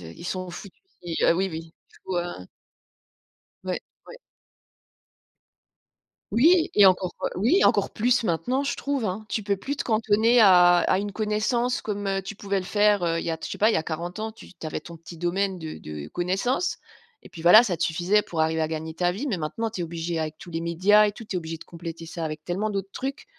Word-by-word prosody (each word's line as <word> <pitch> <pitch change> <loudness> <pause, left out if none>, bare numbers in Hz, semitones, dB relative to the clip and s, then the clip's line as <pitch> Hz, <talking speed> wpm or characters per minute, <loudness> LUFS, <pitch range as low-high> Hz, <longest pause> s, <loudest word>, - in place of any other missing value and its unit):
il - - -11
s'en 185 +1 -4
fout, 175 +4 -9 0.3
il, 170 -2 -4
heu - - +5
oui, 190 +3 0
oui. 165 0 -8 0.2
Du - - -21
coup, 185 - -3
heu 175 - -4 1.2
Ouais, 185 -1 -2 0.3
ouais. - - -11 2.1
Oui 325 +8 +4
et 205 -2 +7
encore, 185 -1 +1 0.2
oui 250 - +3
encore - - +3
plus 245 +2 +2
maintenant 245 +9 0
je 280 - -1
trouve, 275 -4 -2
hein. 205 +3 -3
Tu 215 - -2
peux 200 -1 0
plus 275 +9 -4
te - - -3
cantonner 220 +1 +3
à 180 -3 +7
à 185 - +2
une 205 +1 -3
connaissance 225 +4 0
comme, 205 -1 -3
heu, 195 0 0
tu 205 +3 -7
pouvais 200 -1 -2
le 185 - -7
faire, 205 -1 +3
heu, 165 -1 +1
il - - -5
y - - -1
a 165 - -2
je - - -3
sais - - -6
pas 215 - +5
il - - +2
y - - +2
a - - -1
40 170 +3 -5
ans. 220 +1 -3
Tu 220 - -15
avais 155 - -3
ton 170 +2 -11
petit 165 +1 -12
domaine 185 +2 -1
de 160 -1 -7
de 75 -1 -8
connaissance 195 - -1 0.4
et - - -14
puis 165 - -11
voilà, 180 +6 +9
ça 195 -8 -1
te - - -1
suffisait 180 +6 +2
pour 165 -2 -2
arriver 160 0 +1
à 155 - +1
gagner 160 0 -5
ta 175 +1 +1
vie 220 +11 -4
mais 215 -8 -1
maintenant 170 +9 -3
tu 210 -4 -5
es - - -1
obligé 170 0 -4
avec 155 -1 -3
tous - - -11
les 165 -1 -3
médias 185 +6 +4
et 210 - 0
tout, 225 +2 -11
tu 205 - -5
es - - +2
obligé 165 -1 -5
de - - -12
compléter 165 -1 -8
ça 165 0 -5
avec 155 0 -5
tellement 195 +6 -2
d'autres 195 -1 -3
trucs 270 +5 -5
185 Hz, 230 wpm, -25 LUFS, 170-215 Hz, 2.1 s, voilà